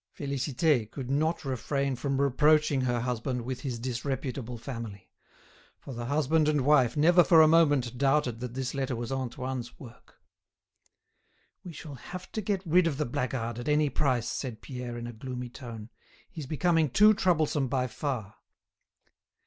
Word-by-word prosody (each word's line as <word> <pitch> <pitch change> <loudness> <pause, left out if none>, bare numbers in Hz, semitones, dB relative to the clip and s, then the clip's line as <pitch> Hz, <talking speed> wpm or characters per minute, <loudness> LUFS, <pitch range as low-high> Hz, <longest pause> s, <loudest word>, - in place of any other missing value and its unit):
Félicité 140 -3 0
could 130 +1 -6
not 155 +3 0
refrain 135 +1 -1
from 135 +2 -2
reproaching 145 +1 +3
her 120 -2 0
husband 125 0 -2
with 130 +1 -5
his 130 -4 -3
disreputable 125 0 -4
family; 115 -5 -8 0.7
for 135 - -10
the 120 0 -5
husband 155 +2 +2
and 150 -2 +2
wife 130 -2 +3
never 175 +4 +6
for 165 -2 +6
a - - +6
moment 145 -7 +3
doubted 135 -4 +1
that 125 0 -6
this 130 0 -3
letter 135 -2 -2
was 115 +1 -5
Antoine's 130 -1 -4
work. 120 -3 -14 1.5
"We 180 - -8
shall 150 -2 -9
have 180 +7 -9
to 215 - -3
get 195 -2 -2
rid 170 +1 +4
of 145 -5 -2
the 150 - 0
blackguard 120 -1 -3
at 120 - -4
any 150 -1 +2
price," 125 -4 0
said 125 -5 -4
Pierre 125 -3 -6
in 120 - -6
a 120 - -6
gloomy 125 +1 -6
tone. 115 -3 -9 0.4
"He's 155 -5 -7
becoming 160 0 +2
too 210 - +6
troublesome 160 -8 +1
by 130 0 0
far." 120 -5 -4
135 Hz, 160 wpm, -28 LUFS, 120-150 Hz, 1.5 s, never